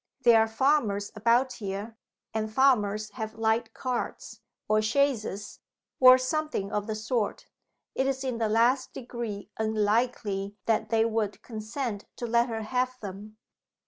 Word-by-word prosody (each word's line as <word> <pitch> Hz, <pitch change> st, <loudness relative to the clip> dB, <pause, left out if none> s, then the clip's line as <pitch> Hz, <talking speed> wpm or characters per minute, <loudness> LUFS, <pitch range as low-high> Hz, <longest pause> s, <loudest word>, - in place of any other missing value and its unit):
"There 235 Hz, -2 st, +7 dB
are 220 Hz, -, +2 dB
farmers 220 Hz, -4 st, +1 dB
about 235 Hz, +4 st, +2 dB
here 205 Hz, +2 st, -5 dB, 0.4 s
and 220 Hz, -1 st, -2 dB
farmers 215 Hz, -4 st, +2 dB
have 220 Hz, 0 st, -6 dB
light 225 Hz, +1 st, +1 dB
carts, 255 Hz, -2 st, -4 dB, 0.3 s
or 215 Hz, 0 st, +3 dB
chaises, 215 Hz, -4 st, 0 dB, 0.4 s
or 255 Hz, 0 st, +9 dB
something 260 Hz, -5 st, -2 dB
of 210 Hz, 0 st, -2 dB
the 220 Hz, -, -2 dB
sort. 220 Hz, 0 st, -2 dB, 0.5 s
It 265 Hz, -, 0 dB
is 270 Hz, 0 st, -1 dB
in 255 Hz, -3 st, -2 dB
the 220 Hz, -2 st, +1 dB
last 240 Hz, +4 st, +2 dB
degree 230 Hz, -5 st, -6 dB
unlikely 215 Hz, -2 st, 0 dB
that 220 Hz, -1 st, +1 dB
they 225 Hz, 0 st, +3 dB
would 220 Hz, -2 st, -2 dB
consent 220 Hz, -1 st, -4 dB
to 240 Hz, -, -5 dB
let 235 Hz, +1 st, +2 dB
her 225 Hz, -1 st, -3 dB
have 255 Hz, +2 st, -1 dB
them. 205 Hz, +2 st, -8 dB
225 Hz, 145 wpm, -28 LUFS, 215-250 Hz, 0.5 s, or